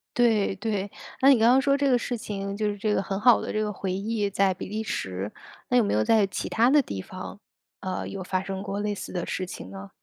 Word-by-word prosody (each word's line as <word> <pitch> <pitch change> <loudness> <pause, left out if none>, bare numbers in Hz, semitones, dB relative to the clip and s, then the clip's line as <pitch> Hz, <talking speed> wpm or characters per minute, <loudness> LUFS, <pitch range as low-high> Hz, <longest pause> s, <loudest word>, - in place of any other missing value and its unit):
对， 220 -5 +3
对， 205 -1 -2 0.3
那 270 - +7
你 265 - +6
刚 230 +2 +5
刚 260 - +6
说 275 +1 +3
这 280 0 +2
个 250 - +5
事 245 +1 -3
情 200 -3 -4
就 210 0 0
是 205 - -4
这 210 +1 0
个 - - +2
很 195 0 -3
好 240 +2 +6
的 - - -4
这 215 0 0
个 210 -1 -2
回 190 -1 -3
忆 205 +2 -1
在 195 -1 +2
比 180 - -7
利 215 +2 -3
时， 95 - -3 0.4
那 250 - +4
有 240 - +5
没 205 - 0
有 110 - +3
在 215 - +4
其 - - -4
它 235 +3 +3
的 290 +1 +5
地 95 - -5
方， 185 - -8 0.4
呃， 185 -1 -3
有 195 -2 -5
发 185 +1 -1
生 195 0 -4
过 200 0 -4
类 210 0 -1
似 - - -7
的 175 -2 -3
事 185 - -3
情 95 - -8
呢？ 95 0 -9
205 Hz, 280 characters per minute, -26 LUFS, 190-225 Hz, 0.4 s, 那